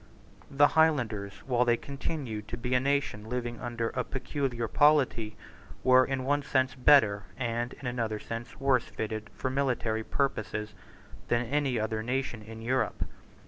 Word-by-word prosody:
The 145 +1 +5
Highlanders, 120 -11 +2
while 125 -2 +2
they 120 -1 +3
continued 135 -7 -5
to 115 - -5
be 125 +2 -2
a 125 - +5
nation 135 -5 -1
living 120 -1 -3
under 120 -2 -2
a 125 - -2
peculiar 130 -2 -2
polity, 135 -7 +3 0.5
were 130 0 +7
in 135 0 -2
one 145 +2 +1
sense 130 -2 +1
better 125 -7 +5
and 120 -1 -2
in - - -12
another 115 -3 -1
sense 115 +2 -7
worse 135 -4 +3
fitted 110 +3 -5
for 130 - -2
military 125 -5 0
purposes 105 -6 -2 0.5
than 120 0 +1
any 135 -1 0
other 110 0 -1
nation 125 -1 -2
in 110 +1 -10
Europe. 130 +3 0
125 Hz, 150 wpm, -29 LUFS, 110-135 Hz, 0.5 s, were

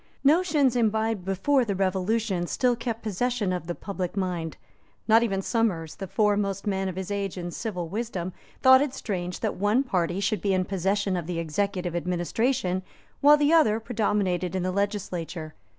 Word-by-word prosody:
Notions 295 -4 +3
imbibed 220 -4 +1
before 220 +9 +2
the 205 -4 -2
Revolution 190 0 0
still 250 +3 +1
kept 230 -1 -4
possession 220 -1 -1
of 180 -2 -4
the 175 - -3
public 190 -2 -5
mind. 175 -4 -2 0.5
Not 225 +1 +6
even 195 -5 0
Somers, 185 -10 0
the 195 - -7
foremost 200 -1 +1
man 195 -2 0
of 185 - -6
his 190 +1 -5
age 200 -2 -2
in 175 -1 -4
civil 180 -4 -4
wisdom, 190 -2 -4 0.3
thought 260 0 +8
it 285 -2 -1
strange 180 -3 -4
that - - -1
one 210 +7 +2
party 180 -6 -1
should 200 +1 0
be 195 -2 +1
in 185 0 +1
possession 195 +1 0
of 170 -3 -3
the 175 -1 -3
executive 175 +2 -2
administration 180 +3 0 0.4
while 295 +1 +7
the 295 +2 +3
other 225 -10 +4
predominated 200 -6 0
in 185 - -1
the 185 - 0
legislature. 180 -5 -3
195 Hz, 170 wpm, -26 LUFS, 180-225 Hz, 0.5 s, thought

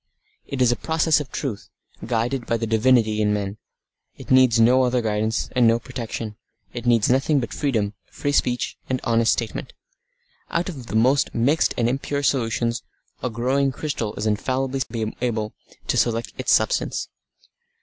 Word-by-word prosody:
It 135 -2 0
is 120 - +4
a - - +2
process 160 +1 +2
of 145 -3 -7
truth, 125 -9 -4 0.3
guided 120 +2 -1
by 115 - +1
the 115 - -2
divinity 110 -1 +3
in 105 -1 +2
men. 100 0 -4 0.6
It - - -9
needs 130 -3 +5
no 125 +3 +5
other 125 0 +2
guidance, 110 0 -1
and 125 -2 +5
no 115 0 +4
protection. 115 -3 -6 0.4
It 120 0 -5
needs 115 -3 +4
nothing 135 +3 +3
but 120 -5 -4
freedom, 110 -8 0 0.2
free 145 - -2
speech, 125 -3 0
and 130 -1 0
honest 115 -1 +3
statement. 115 -2 -4 0.8
Out 170 +2 -1
of 135 -9 -8
the 110 - -5
most 130 +5 +3
mixed 140 +8 +2
and 115 - +2
impure 140 +3 -2
solutions 120 -3 0 0.4
a 125 - -1
growing 130 +4 +1
crystal 130 -6 -3
is 105 - -3
infallibly 125 0 -1
able 110 -3 -1 0.3
to - - 0
select 115 0 0
its - - -1
substance. - - +1
120 Hz, 160 wpm, -23 LUFS, 115-130 Hz, 0.8 s, needs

